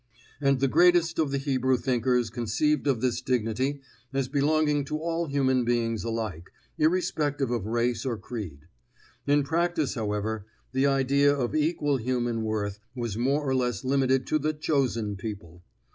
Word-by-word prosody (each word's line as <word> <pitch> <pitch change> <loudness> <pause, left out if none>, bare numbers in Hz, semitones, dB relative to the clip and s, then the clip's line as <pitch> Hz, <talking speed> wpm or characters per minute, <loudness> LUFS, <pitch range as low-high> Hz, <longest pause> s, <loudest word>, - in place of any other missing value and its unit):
And 140 -2 +3
the 135 - +3
greatest 170 +2 +4
of 155 -3 +2
the 140 - -1
Hebrew 130 -2 +1
thinkers 125 -2 +1
conceived 120 +6 0
of 130 -5 +1
this 125 -2 0
dignity 130 +3 -1 0.3
as 135 -1 -1
belonging 150 +1 +2
to 150 - -3
all 165 +1 -2
human 130 -3 +2
beings 115 -2 0
alike, 110 -7 -4 0.3
irrespective 150 -5 +1
of 115 -4 -2
race 120 +1 0
or 125 -4 -2
creed. 100 - -7 0.7
In 145 0 +4
practice, 165 -2 0
however, 105 -1 -3 0.2
the 135 +2 +2
idea 140 +1 +3
of 135 -4 -1
equal 150 -2 +1
human 120 -1 -1
worth 105 -2 -2 0.2
was 120 -5 -3
more 135 +5 0
or 135 - +1
less 125 -5 0
limited 130 -1 +2
to 155 - +1
the 155 +2 0
Chosen 130 -9 -1
People. 95 -5 -7
130 Hz, 155 wpm, -27 LUFS, 115-145 Hz, 0.7 s, greatest